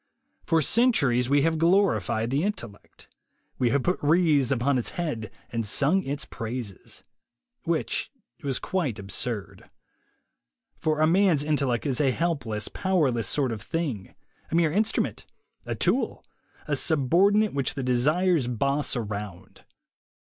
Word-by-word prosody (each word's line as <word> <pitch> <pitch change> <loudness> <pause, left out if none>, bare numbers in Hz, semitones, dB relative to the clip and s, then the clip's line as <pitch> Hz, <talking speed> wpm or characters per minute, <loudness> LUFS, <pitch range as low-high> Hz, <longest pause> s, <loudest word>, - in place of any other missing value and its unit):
For 165 -1 +3
centuries 140 - +2
we 140 0 +3
have 165 0 +1
glorified 160 - +2
the 140 +2 +1
intellect; 120 - -6 0.5
we 125 - +2
have 140 +1 +1
put 180 - 0
wreaths 150 -4 +3
upon 130 0 +1
its 120 - -3
head 145 - -3 0.2
and 115 -1 -1
sung 140 - +2
its 145 -2 -3
praises. 115 -4 -6 0.6
Which - - -1 0.3
was 135 -2 -1
quite 155 - -2
absurd. 100 +2 -4 1.1
For 155 -1 -1
a - - +6
man's 170 -3 +3
intellect 140 -5 0
is 135 -1 +1
a 140 - +3
helpless, 130 -8 -1
powerless 145 - 0
sort 135 -4 +1
of 110 -2 -5
thing, 140 - -4 0.3
a - - -2
mere 165 -2 +3
instrument, 215 +6 0 0.4
a - - -2
tool, - - -1 0.4
a - - 0
subordinate, 185 +8 +3
which 140 -1 -1
the 135 - -3
desires 150 +5 +2
boss 140 +5 0
around. 100 -5 -6
140 Hz, 135 wpm, -26 LUFS, 120-165 Hz, 1.1 s, a